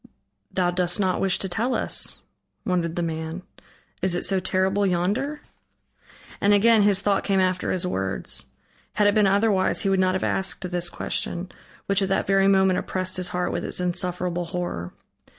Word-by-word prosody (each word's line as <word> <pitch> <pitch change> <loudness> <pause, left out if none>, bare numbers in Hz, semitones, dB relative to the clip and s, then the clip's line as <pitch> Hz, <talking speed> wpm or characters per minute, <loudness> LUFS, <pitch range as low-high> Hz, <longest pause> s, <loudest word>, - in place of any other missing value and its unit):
"Thou 180 -2 +1
dost 175 +1 0
not 185 -2 +1
wish 195 -2 +2
to 195 - -1
tell 225 +8 -1
us," - - 0 0.4
wondered 175 -4 -1
the 175 - -1
man, 160 +2 -4 0.6
"is 180 -1 0
it 175 - -2
so 190 0 +1
terrible 190 +2 +1
yonder?" 200 +11 0 1.0
And 205 +1 +5
again 225 +1 +5
his 200 -1 +3
thought 200 -1 +1
came 195 -1 +1
after 185 -1 0
his 185 -1 0
words. 95 - -2 0.5
Had 210 - +2
it 205 - +4
been 210 -1 +4
otherwise, 200 -1 +2
he 200 - 0
would 195 -1 +2
not 185 0 +2
have 185 - -2
asked 190 0 0
this 175 0 -1
question, 175 +1 -3 0.3
which 200 0 +2
at 195 - 0
that 195 - +1
very 195 0 +3
moment 190 -1 +4
oppressed 185 0 -2
his 180 -1 0
heart 180 0 -2
with - - -3
its - - -3
insufferable 180 -1 -2
horror. 165 - -4
185 Hz, 180 wpm, -24 LUFS, 180-195 Hz, 1.0 s, And